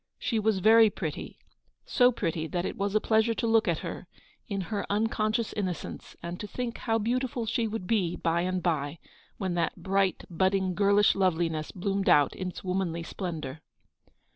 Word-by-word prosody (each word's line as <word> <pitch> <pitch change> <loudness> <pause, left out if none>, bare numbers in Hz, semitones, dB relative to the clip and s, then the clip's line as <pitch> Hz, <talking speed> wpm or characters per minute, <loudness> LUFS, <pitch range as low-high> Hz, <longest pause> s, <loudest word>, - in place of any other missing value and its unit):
She 225 - -1
was 215 -3 +1
very 220 +2 +7
pretty; 160 -6 -5 0.5
so 250 -1 +4
pretty 165 -8 -2
that 175 +1 -2
it - - -3
was 200 +1 -2
a - - +6
pleasure 220 +1 +2
to - - -1
look 225 -1 +3
at - - +2
her, - - -6 0.4
in 200 -4 -2
her 205 - -1
unconscious 215 +1 0
innocence, 185 -5 -4
and 170 +1 -5
to 210 - -5
think 245 +1 -4
how 225 -2 +1
beautiful 240 +2 -1
she 225 +1 0
would 220 -3 -4
be 180 -4 +1
by 165 +1 0
and 185 0 -1
by, 150 -3 -1 0.4
when 185 -2 -2
that 170 -1 0
bright, 190 +1 0
budding, 190 +1 +1
girlish 200 +2 +4
loveliness 165 -4 0
bloomed 195 +1 -1
out 145 -2 +5
in 185 - -4
its 180 - -7
womanly 180 -3 -1
splendour. 160 -5 -5
195 Hz, 175 wpm, -28 LUFS, 175-220 Hz, 0.5 s, very